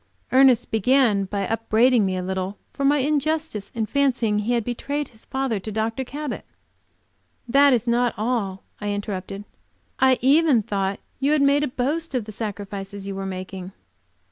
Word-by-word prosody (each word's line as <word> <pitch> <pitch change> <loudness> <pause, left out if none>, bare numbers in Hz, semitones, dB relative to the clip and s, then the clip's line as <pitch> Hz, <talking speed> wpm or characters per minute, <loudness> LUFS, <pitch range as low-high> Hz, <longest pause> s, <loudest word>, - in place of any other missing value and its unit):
Ernest 255 -2 +5
began 225 -2 +3
by 200 0 -2
upbraiding 225 0 +3
me 185 -1 -1
a 180 - -3
little 190 +1 -3 0.2
for 280 - -4
my 285 +2 +4
injustice 295 -4 -1
in 225 -2 0
fancying 245 -5 +1
he 220 +4 0
had 235 -2 +1
betrayed 280 +5 -3
his 220 -2 -17
father 265 -5 -1
to 215 +3 -6
Dr. 225 +4 -1
Cabot. 290 +3 -5 1.0
"That 280 +3 +5
is 245 -2 +2
not 240 0 +1
all," 210 -4 -2 0.2
I 205 - -3
interrupted, 200 -1 -5 0.6
"I 260 -1 +5
even 275 -2 +4
thought 195 0 -2 0.2
you 280 +3 +2
had 300 -2 +3
made 280 +1 +4
a - - +1
boast 280 +5 -2
of 240 -4 -1
the 215 - -8
sacrifices 200 -2 -6
you 200 - -4
were 195 0 -4
making." 185 0 -6
230 Hz, 170 wpm, -23 LUFS, 200-270 Hz, 1.0 s, Ernest